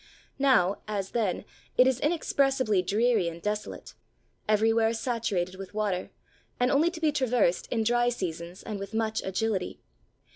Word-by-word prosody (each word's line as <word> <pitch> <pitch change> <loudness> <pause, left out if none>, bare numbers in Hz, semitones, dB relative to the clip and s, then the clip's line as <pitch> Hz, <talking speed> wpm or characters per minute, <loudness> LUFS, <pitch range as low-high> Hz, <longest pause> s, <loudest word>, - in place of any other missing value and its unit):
Now, 230 -9 +3
as 200 -2 -3
then, 210 -5 -1 0.3
it 250 - +7
is 260 -1 +2
inexpressibly 270 - +1
dreary 215 +1 +2
and 170 0 -5
desolate; 210 +3 -4 0.6
everywhere 225 +1 +3
saturated 225 -7 -1
with 195 +1 -9
water, 200 -4 -1 0.5
and 250 +1 +3
only 300 +5 +4
to 345 -1 -8
be 315 -2 +2
traversed 250 -10 +1
in 225 -2 0
dry 240 +2 +3
seasons 175 -5 -5
and 210 -3 -5
with 200 +3 -6
much 220 -1 0
agility. 190 0 -2
220 Hz, 145 wpm, -28 LUFS, 195-245 Hz, 0.6 s, it